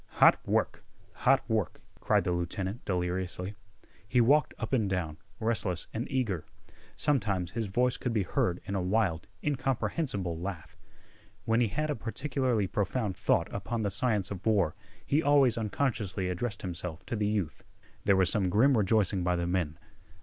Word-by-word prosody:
"Hot -, -, +7 dB
work! -, -, 0 dB, 0.3 s
Hot 135 Hz, +1 st, +2 dB
work!" 110 Hz, -5 st, -1 dB, 0.2 s
cried -, -, +2 dB
the -, -, 0 dB
lieutenant 95 Hz, +5 st, -2 dB
deliriously. 90 Hz, +1 st, -2 dB, 0.5 s
He 125 Hz, -, +2 dB
walked 145 Hz, +6 st, +4 dB
up 110 Hz, +3 st, -4 dB
and 110 Hz, -6 st, +2 dB
down, 85 Hz, -5 st, -2 dB, 0.2 s
restless 110 Hz, -6 st, 0 dB
and 115 Hz, +4 st, -3 dB
eager. 115 Hz, -, -1 dB, 0.5 s
Sometimes 100 Hz, -, 0 dB
his 110 Hz, 0 st, -2 dB
voice 125 Hz, +5 st, +1 dB
could 125 Hz, -, -2 dB
be 110 Hz, -3 st, +1 dB
heard 90 Hz, 0 st, 0 dB
in 100 Hz, -, -4 dB
a 95 Hz, -, 0 dB
wild, 90 Hz, -3 st, 0 dB, 0.2 s
incomprehensible 130 Hz, -, -1 dB
laugh. 85 Hz, -4 st, -6 dB, 0.7 s
When 115 Hz, +1 st, +3 dB
he 120 Hz, -, +3 dB
had 150 Hz, +8 st, -1 dB
a -, -, -1 dB
particularly 125 Hz, -1 st, -1 dB
profound 100 Hz, 0 st, -1 dB
thought 95 Hz, -2 st, +2 dB
upon 110 Hz, +3 st, -2 dB
the 100 Hz, -, 0 dB
science 100 Hz, -2 st, +1 dB
of 100 Hz, -1 st, -5 dB
war 100 Hz, -8 st, +2 dB, 0.3 s
he 145 Hz, +3 st, +2 dB
always 140 Hz, -6 st, +4 dB
unconsciously 105 Hz, -5 st, -1 dB
addressed 100 Hz, +4 st, -3 dB
himself 90 Hz, -1 st, -4 dB
to -, -, -3 dB
the 105 Hz, -1 st, 0 dB
youth. 105 Hz, -7 st, -2 dB, 0.4 s
There 100 Hz, -, +5 dB
was 95 Hz, -2 st, +4 dB
some 95 Hz, -3 st, +2 dB
grim 130 Hz, +9 st, +4 dB
rejoicing 100 Hz, -3 st, +2 dB
by 90 Hz, 0 st, +2 dB
the 85 Hz, 0 st, -1 dB
men. 85 Hz, -3 st, -1 dB
105 Hz, 165 wpm, -30 LUFS, 90-120 Hz, 0.7 s, Hot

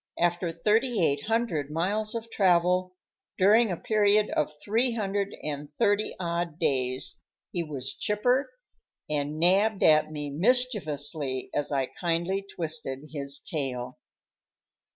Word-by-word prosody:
After 175 Hz, 0 st, +1 dB
thirty 215 Hz, +4 st, +2 dB
eight 140 Hz, -1 st, 0 dB
hundred 220 Hz, -, -1 dB
miles 205 Hz, +8 st, -1 dB
of 230 Hz, 0 st, -5 dB
travel, 180 Hz, -1 st, +2 dB, 0.4 s
during 215 Hz, +4 st, +5 dB
a 180 Hz, -, -2 dB
period 210 Hz, +1 st, +2 dB
of 150 Hz, -, 0 dB
three 230 Hz, +4 st, +2 dB
hundred 200 Hz, -2 st, -2 dB
and 145 Hz, -1 st, -4 dB
thirty 205 Hz, +1 st, +1 dB
odd 170 Hz, -2 st, -2 dB
days, 130 Hz, -4 st, -1 dB, 0.3 s
he 175 Hz, -, -1 dB
was 140 Hz, -5 st, -4 dB
chipper 245 Hz, +6 st, +1 dB, 0.6 s
and 150 Hz, 0 st, -1 dB
nabbed 195 Hz, +5 st, +4 dB
at 155 Hz, 0 st, +5 dB
me 145 Hz, -2 st, -5 dB
mischievously 155 Hz, -, 0 dB
as 145 Hz, -, -2 dB
I 135 Hz, -2 st, +1 dB
kindly 175 Hz, +6 st, -1 dB
twisted 155 Hz, -3 st, -4 dB
his 140 Hz, -1 st, -3 dB
tail. 130 Hz, -5 st, -4 dB
170 Hz, 125 wpm, -27 LUFS, 145-210 Hz, 0.6 s, during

